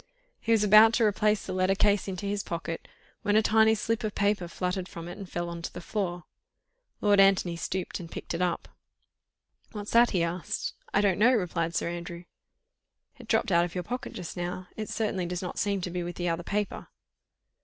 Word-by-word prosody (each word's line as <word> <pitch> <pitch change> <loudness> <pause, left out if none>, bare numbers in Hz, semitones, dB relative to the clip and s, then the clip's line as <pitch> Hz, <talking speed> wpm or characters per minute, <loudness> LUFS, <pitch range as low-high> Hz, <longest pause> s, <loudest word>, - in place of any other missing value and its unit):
He 230 - -2
was 220 -2 +4
about 215 +2 +8
to 235 - +3
replace 210 0 +2
the - - -4
letter 185 +1 +2
case 205 0 +2
into 190 0 -4
his 200 0 -1
pocket, 165 -2 -5 0.3
when 205 -2 +1
a 220 - +5
tiny 220 +1 +5
slip 225 +1 -1
of 215 -1 -3
paper 200 -3 +1
fluttered 180 +1 -3
from 170 0 -8
it 175 - -7
and 195 -3 -9
fell 175 0 -3
on 170 0 -6
to - - -5
the - - -7
floor. 175 -2 -3 0.8
Lord 205 -1 +4
Antony 195 -3 +4
stooped 185 +3 -3
and 170 -2 -8
picked - - -6
it 165 - -2
up. 180 -1 -1 1.1
"What's 210 -1 -6
that?" 235 +1 +6
he 180 -4 +1
asked. 170 +1 -3 0.2
"I 205 - +3
don't 195 -2 +2
know," 235 +4 +6
replied 170 -6 -1
Sir - - 0
Andrew. 170 0 -6 1.0
"It 240 - -12
dropped 220 -3 +1
out 170 -1 +5
of 175 0 -5
your 180 - -2
pocket 250 +7 -5
just 175 - -6
now. 180 +1 -4
It 215 -1 -5
certainly 195 -5 -1
did 180 +1 -4
not 180 - -4
seem 200 -1 0
to 180 - -4
be 180 0 -2
with 175 0 -5
the 175 -1 -1
other 165 +1 -1
paper." 205 +3 -3
185 Hz, 210 wpm, -28 LUFS, 175-210 Hz, 1.1 s, about